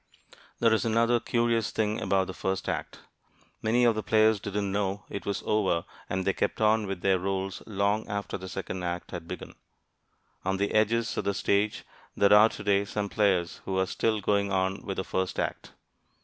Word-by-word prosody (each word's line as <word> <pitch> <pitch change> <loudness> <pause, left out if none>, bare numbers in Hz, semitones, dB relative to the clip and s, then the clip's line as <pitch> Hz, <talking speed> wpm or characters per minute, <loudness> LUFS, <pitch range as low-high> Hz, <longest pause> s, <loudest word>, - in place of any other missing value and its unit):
There 115 -1 +4
is 110 - +2
another 115 +1 +3
curious 115 -1 +1
thing 110 0 -1
about 95 0 +2
the 95 - -6
first 95 +1 -2
act. - - -4 0.6
Many 115 +3 +2
of 120 -1 +5
the 110 - -2
players 110 +2 +3
didn't 100 0 -2
know 100 0 -1
it 100 - -5
was 100 - -2
over 95 -6 +1 0.2
and 95 0 -1
they 95 - +2
kept - - -1
on 110 -1 +3
with 95 -2 -4
their 95 -1 +3
roles 95 0 -3
long 100 +1 0
after 100 -1 -3
the 95 -1 -6
second 95 -1 -5
act 90 0 -4
had 85 -2 -6
begun. - - -7 0.9
On 95 +1 0
the 100 +1 0
edges 115 +2 +2
of - - -1
the 100 0 0
stage 100 +2 +1 0.3
there 100 0 +5
are 105 +2 +8
today 100 -2 +1
some 100 0 -3
players 95 -5 +1
who 95 - -2
are 95 - +3
still 110 +2 0
going 100 -1 +1
on 95 +1 0
with 95 -2 -4
the 95 - -1
first 95 -1 -2
act. - - -3
100 Hz, 190 wpm, -28 LUFS, 95-110 Hz, 0.9 s, are